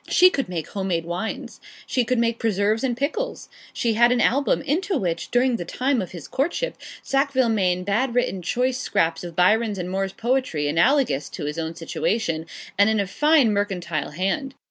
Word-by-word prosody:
She 365 +1 +6
could 275 - -2
make 170 -4 -4
home 195 -1 -3
made 165 -3 -1
wines. 180 +6 -5 0.2
She 250 - +1
could 250 +1 0
make 230 0 +1
preserves 215 +1 +1
and 245 -3 0
pickles. 305 - -3 0.2
She 230 -2 0
had 235 +2 +5
an 250 - +2
album, 280 +5 +2
into 345 +6 0
which, 170 -6 -2
during 245 0 +2
the - - -4
time 255 +7 0
of 185 - -5
his 170 -4 -9
courtship, 340 - -1 0.3
Sackville 275 -3 +1
Maine 180 -4 +1
bad 235 +6 0
written 195 -6 0
choice 250 +8 0
scraps 165 +1 0
of 170 -2 -7
Byron's 210 +4 +3
and 180 0 -4
Moore's 195 0 -2
poetry, 240 - 0
analogous 165 - +2
to - - -6
his 150 +3 -3
own 160 0 -4
situation, 165 -1 -2 0.3
and 200 +2 +6
in 220 -1 +1
a 200 - +1
fine 290 +2 +3
mercantile 180 -6 -2
hand. 195 - -2
220 Hz, 190 wpm, -23 LUFS, 180-260 Hz, 0.3 s, She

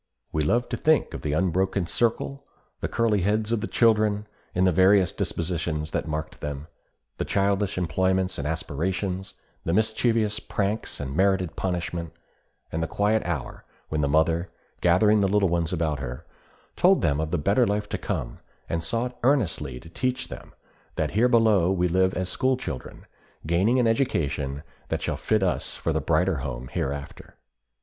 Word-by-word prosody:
We 80 - 0
love 120 +11 +2
to - - -2
think 155 -1 +2
of - - -5
the 75 -1 -2
unbroken 95 +3 +1
circle; 120 +8 -1 0.4
the - - -2
curly 110 -4 +1
heads 105 +3 0
of 115 -2 +1
the 115 - -2
children, 105 -2 +3 0.3
and 90 +1 +3
the 95 - +4
various 95 +1 +4
dispositions 80 -2 -2
that - - -2
marked 75 0 -4
them; 75 0 -4 0.5
the - - +1
childish 100 0 0
employments 95 +1 0
and 75 - -2
aspirations; 90 +5 -2 0.3
the 85 - -1
mischievous 110 0 +1
pranks 105 +2 -2
and 70 -1 -4
merited 95 -2 +2
punishment; 85 -3 -3 0.6
and 80 - -2
the 80 - 0
quiet 105 +4 +1
hour 80 -7 -4 0.3
when 75 -1 0
the 70 - +2
mother, 80 +4 +2 0.3
gathering 105 +5 +4
the 100 - +3
little 100 -1 +3
ones 85 -1 0
about 80 -5 -1
her, 65 -1 -6 0.5
told - - +4
them 70 +1 +2
of 80 0 -1
the 90 - 0
better 100 - +3
life 105 +1 -1
to - - -3
come, - - -4 0.3
and 85 - -1
sought 120 +7 -2
earnestly 110 - +1
to 80 - -14
teach 130 +5 -2
them - - -9 0.4
that 80 -2 -1
here 115 +5 +3
below 110 -7 +4
we 90 -2 +2
live 95 +2 +2
as 95 -1 -1
school 130 +7 +1
children, 80 - -7 0.4
gaining 95 +10 +2
an 125 - +3
education 75 - 0 0.3
that - - -2
shall - - -1
fit 110 -2 +1
us 90 - -1
for 80 - -1
the 80 - 0
brighter 80 +3 +2
home 60 -1 -5
hereafter. 70 +1 -5
95 Hz, 170 wpm, -26 LUFS, 80-105 Hz, 0.6 s, the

